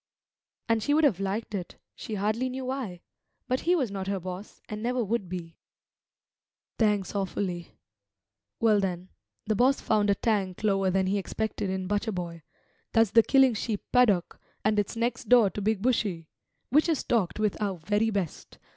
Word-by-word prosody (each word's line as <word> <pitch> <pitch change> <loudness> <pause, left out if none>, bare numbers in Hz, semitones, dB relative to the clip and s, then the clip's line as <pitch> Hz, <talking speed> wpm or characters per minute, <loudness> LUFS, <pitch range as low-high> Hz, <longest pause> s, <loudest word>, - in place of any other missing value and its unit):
And 230 -1 +2
she 290 +7 +2
would 315 - +3
have 225 - +3
liked 200 +3 -3
it, 185 -4 -5 0.2
she 220 - -6
hardly 215 +6 0
knew 260 +1 -5
why. 250 -10 -4 0.5
But 255 0 +1
he 355 +2 +2
was 260 - 0
not 195 -1 -4
her 195 -1 -1
boss, 185 +3 -8
and 210 0 -6
never 245 +1 0
would 210 -3 -2
be. 170 -2 -6 1.2
"Thanks 210 -4 +1
awfully. 185 -3 -3 0.8
Well, 220 -2 +4
then, 185 -2 -3 0.4
the 215 - +1
boss 255 +6 +3
found 210 -2 +1
a 200 - +4
tank 195 -3 -1
lower 195 -2 +2
than 190 +1 +1
he 200 +2 +1
expected 215 0 -3
in 190 0 -2
Butcher 205 +3 -1
boy, 170 -2 -5 0.5
that's 225 -3 +4
the 230 +1 +7
killing 265 +1 +4
sheep 215 -1 -3
paddock, 215 -9 +3 0.3
and 215 -1 +3
it's 205 +2 -2
next 235 0 -2
door 235 -6 +6
to 205 - -5
Big 210 0 0
Bushy, 200 -10 0 0.4
which 300 +5 +4
is 320 - +2
stocked 215 -7 0
with 215 -2 +1
our 195 -3 -1
very 205 +7 +1
best. 195 -7 -4
210 Hz, 175 wpm, -28 LUFS, 190-230 Hz, 1.2 s, the